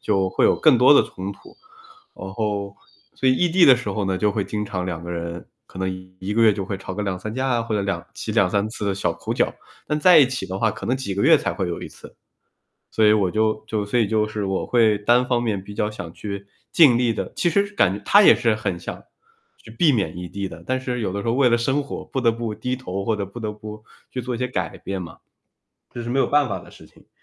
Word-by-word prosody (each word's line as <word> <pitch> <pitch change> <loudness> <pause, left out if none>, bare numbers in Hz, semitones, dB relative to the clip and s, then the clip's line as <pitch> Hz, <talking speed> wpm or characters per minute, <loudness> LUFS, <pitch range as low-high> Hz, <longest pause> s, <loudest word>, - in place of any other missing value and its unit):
就 95 -3 +1
会 95 - +1
有 - - +5
更 155 -5 +5
多 125 +4 +6
的 145 - +6
冲 95 +2 -6
突。 - - -17 0.6
然 95 - -8
后 100 -2 -3 0.4
所 135 - -2
以 130 - +4
异 175 +6 +2
地 175 +1 +5
的 135 - +8
时 120 -3 -6
候 100 +1 -2
呢， 95 -1 -1
就 105 +1 +2
会 105 -1 -1
经 105 +1 -3
常 95 -2 -3
两 85 -3 -4
个 85 - -7
人 85 0 -5 0.2
可 - - -12
能 95 0 -5
1 95 +3 -4
个 115 - +3
月 110 - +6
就 100 -1 -4
会 100 +1 -4
吵 95 0 -7
个 105 - -3
2，3 100 +2 -4
架 130 +1 -1
啊 120 -2 +1
或 115 -1 -3
者 105 - +1
两 100 0 -3
起 - - -5
2，3 100 +3 +2
次 110 -1 -6
的 100 -1 0
小 100 - -1
口 - - -4
角。 - - 0 0.3
但 150 - -1
在 175 +3 +7
一 145 - +7
起 130 0 -4
的 95 +1 -5
话， 110 +1 +2
可 - - -8
能 125 - +1
几 130 -7 -4
个 100 - -1
月 - - +6
才 - - -2
会 95 - -2
有 85 - -4
1 - - -7
次。 - - -15 0.8
所 110 - +1
以 105 - +6
我 105 -4 +2
就 110 +2 0
就 105 -2 -2
所 120 +4 0
以 110 - +2
就 110 0 +1
是 105 -1 -4
我 95 -1 -2
会 110 -4 +3
单 120 +4 +3
方 120 -2 +1
面 105 -5 -1
比 105 +2 -10
较 105 +1 -1
想 85 -6 -8
去 100 -1 -7 0.2
尽 140 -8 +6
力 120 -2 +1
地 - - -5
其 175 - +1
实 200 +4 +1
感 100 - +2
她 205 - +6
也 - - +8
是 115 -2 +1
很 100 -5 -3
想 - - -7 0.5
去 - - -17
避 165 -4 +3
免 100 - -1
异 90 0 -6
地 100 -1 -4
的。 - - -11
但 130 0 -1
是 125 -2 -3
有 100 -4 -2
的 100 +1 -3
时 100 - -6
候 115 - +2
为 130 0 +4
了 120 - +3
生 135 +5 0
活 140 - -7
不 130 - -3
得 115 -2 +4
不 115 -2 -4
低 125 +3 -3
头， 100 -6 -5
或 110 +2 0
者 100 - -2
不 100 +5 -12
得 110 -1 -3
不 105 0 -10 0.3
去 125 - -4
做 125 +1 -4
一 - - -5
些 125 +1 -1
改 95 -9 -4
变 95 -1 -5
嘛。 85 - -9 0.8
这 120 - -6
是 120 - -6
没 130 +3 0
有 - - +3
办 145 -2 +2
法 100 - -3
的 - - -15
事 - - -15
情。 - - -23
105 Hz, 285 characters per minute, -22 LUFS, 95-125 Hz, 0.8 s, 的